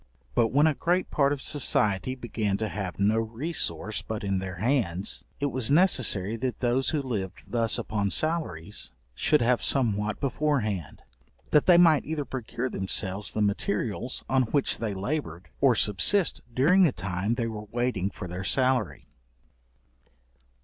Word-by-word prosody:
But 115 - +3
when 145 +6 +3
a 160 - +4
great 175 +5 0
part 140 -1 +2
of 145 -2 -3
society 130 -5 +1
began 110 -5 -2
to 110 +1 -2
have 95 -4 -5
no 105 +3 +3
resource 110 - -1
but 110 -1 -5
in 100 -1 0
their 95 -1 -5
hands, 100 -4 -1
it 140 -1 -1
was 125 -2 -1
necessary 130 - +2
that 125 -1 -3
those 125 +2 +1
who 150 -3 -1
lived 100 -8 -4
thus 115 -2 +1
upon 100 -2 -2
salaries, 105 - -2 0.2
should 140 - +2
have 120 +1 +2
somewhat 110 -5 0
before 145 +1 0
hand, 100 -8 -5 0.5
that 150 - +4
they 175 -2 +7
might 165 -4 +5
either 155 -2 -3
procure 125 -1 -4
themselves 95 -2 -1
the 105 - 0
materials 105 +4 -1
on 130 0 +2
which 140 -2 0
they 110 -4 -3
laboured, 95 - -4
or 135 -4 +5
subsist 105 - +3
during 150 +11 +4
the 170 -6 +5
time 95 +3 -2
they 120 - -1
were 110 -2 -5
waiting 120 -5 -1
for 95 - -8
their 90 +2 -6
salary. 125 - +1
115 Hz, 155 wpm, -27 LUFS, 100-140 Hz, 0.5 s, they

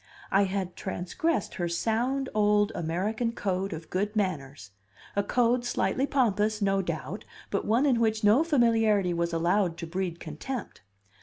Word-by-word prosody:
I 195 +1 +4
had 190 -2 -3
transgressed 210 - -2
her 175 -1 -2
sound 240 +9 0
old 210 0 +3
American 205 +8 -1
code 195 -2 -2
of 160 -1 -7
good 205 +4 -1
manners, 140 - -3 0.4
a 200 - +3
code 240 +3 +2
slightly 260 +2 0
pompous 215 -6 +1
no 195 -1 +2
doubt, 170 +3 -4 0.3
but 200 - -1
one 235 +6 +3
in 255 -5 +3
which 220 -1 +1
no 215 +9 +5
familiarity 225 - +3
was 170 0 -1
allowed 170 +1 +1
to 170 - -5
breed 175 0 -3
contempt. 190 - -6
205 Hz, 150 wpm, -28 LUFS, 175-230 Hz, 0.4 s, no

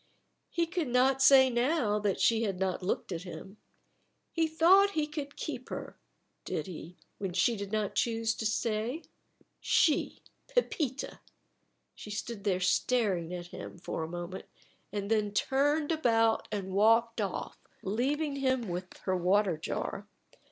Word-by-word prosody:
He 340 - 0
could 335 -2 -2
not 255 +2 +3
say 270 -1 +8
now 240 -3 +1
that 205 -2 0
she 225 -1 +3
had 195 -5 -1
not 190 -1 -1
looked 185 +1 -2
at 165 -2 -3
him. 185 +3 -9 0.7
He 325 -1 +1
thought 370 +6 +5
he 305 - +2
could 295 -2 -6
keep - - -5
her, - - -6 0.5
did - - -3
he, 175 -1 -9 0.2
when 195 -3 -3
she 190 +6 +3
did 200 -1 -6
not 215 -2 -1
choose 225 -1 +1
to 220 - 0
stay? 225 +7 -1 0.6
She, 305 - +2 0.2
Pepita! 315 - -1 0.7
She - - -10
stood 210 0 -5
there 185 -3 +2
staring 185 -3 +1
at 175 -1 -6
him - - -8
for 170 - -4
a 160 - -3
moment, 175 +2 -6 0.5
and 205 +1 -3
then 210 -2 +1
turned 290 +6 +2
about 225 -8 +2
and 190 -2 -3
walked 225 +3 +4
off, 195 -3 -4 0.2
leaving 280 +8 -1
him 260 -5 0
with 180 +1 -5
her 185 - 0
water 185 +1 +2
jar. 155 - -4
225 Hz, 150 wpm, -30 LUFS, 190-270 Hz, 0.7 s, say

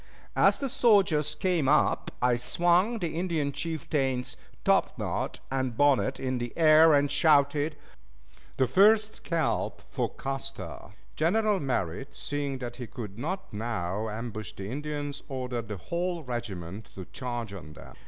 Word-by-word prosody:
As - - +5
the 275 - -2
soldiers 190 - +3
came 170 -5 +1
up 150 - +3
I 125 -1 +4
swung 175 - +2
the 175 -6 -3
Indian 165 -5 0
chieftain's 135 -5 -2 0.3
topknot - - 0
and 130 -3 -1
bonnet 140 -2 +3
in 130 -1 -1
the 120 -1 -4
air 160 -1 +7
and 145 0 +2
shouted, 150 -1 +3 0.8
"the 130 - +4
first 210 - +4
scalp 165 -2 -1
for - - -1
Custer." 135 -9 -6 0.2
General 205 +5 +2
Merritt, 130 - -2
seeing 145 -2 -3
that 120 -2 -6
he 125 -2 -6
could 110 -4 -8
not 180 - -4
now 105 -1 -2
ambush 110 -2 -5
the 100 0 -7
Indians, 145 0 -4
ordered 125 -4 -3
the 105 -2 -5
whole 170 - -3
regiment 110 - -5
to 95 - -7
charge 120 -3 -5
upon 80 -6 -9
them. - - -13
135 Hz, 140 wpm, -28 LUFS, 120-160 Hz, 0.8 s, air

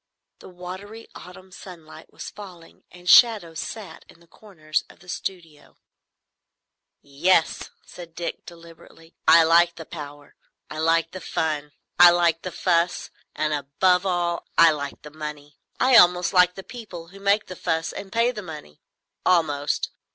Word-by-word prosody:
The - - -13
watery 190 +5 -10
autumn 185 +1 -13
sunlight 165 -4 -13
was - - -9
falling, 180 -5 -14
and 180 0 -16
shadows 200 -8 +5
sat 200 -8 -8
in - - -18
the 170 - -22
corners 165 -5 -5
of - - -17
the 180 - -21
studio. 170 -5 -8 1.3
"Yes," 160 +5 +1 0.2
said 170 -2 -12
Dick, 175 - -5
deliberately, 165 -1 -15
"I 165 0 +8
like 170 +1 +4
the 165 - -10
power; 145 -3 -10 0.4
I 155 - -6
like 165 +1 +1
the 185 - -8
fun; 150 -3 -3 0.3
I 175 0 +10
like 170 -1 +2
the 185 - -6
fuss; 170 -1 0 0.2
and 155 0 -1
above 150 +6 +1
all 175 -2 -2
I 165 -1 +7
like 145 -2 -6
the 150 - -11
money. 150 -1 -9 0.2
I 255 -1 +5
almost 180 -2 +5
like 180 -1 +4
the 195 - -9
people 185 -9 -10
who 195 +2 -14
make 200 +2 +1
the 185 - -9
fuss 165 0 -2
and 195 - -9
pay 230 +2 +2
the 215 -4 -7
money. 150 - -11 0.4
Almost. 150 -5 0
170 Hz, 155 wpm, -23 LUFS, 160-185 Hz, 1.3 s, I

